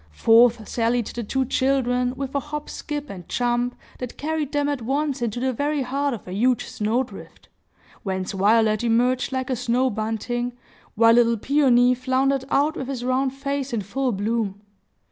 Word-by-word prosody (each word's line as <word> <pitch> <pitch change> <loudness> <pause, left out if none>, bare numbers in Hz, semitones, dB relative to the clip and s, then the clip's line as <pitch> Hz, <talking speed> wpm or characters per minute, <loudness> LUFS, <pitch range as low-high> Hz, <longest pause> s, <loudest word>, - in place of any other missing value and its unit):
Forth 230 - +4
sallied 235 0 0
the 235 - -5
two 265 +5 -1
children, 250 -1 +1
with 270 0 -5
a 280 - +1
hop 295 +1 -6
skip 295 -1 -5
and 180 -7 -10
jump, 245 0 0 0.2
that 250 -1 -6
carried 305 -1 -2
them 290 -1 0
at 285 -3 -2
once 275 +2 -1
into 235 0 -2
the 260 +1 0
very 290 +3 -1
heart 275 +1 -1
of 210 - -13
a 180 - -6
huge 240 +4 +1
snow 220 +5 0
drift, 255 - -13 0.5
whence 190 -2 -3
Violet 215 +2 +3
emerged 245 +3 +2
like 260 0 -2
a - - +1
snow 250 +2 +1
bunting, 225 +3 -2 0.4
while 230 +1 +6
little 235 -1 +4
Peony 250 -1 +4
floundered 260 +2 0
out 295 +3 +2
with 265 - -5
his 255 -3 -4
round 260 +1 +1
face 275 -1 -3
in 225 - 0
full 250 +7 -1
bloom. 205 -1 -2
250 Hz, 175 wpm, -23 LUFS, 230-270 Hz, 0.5 s, while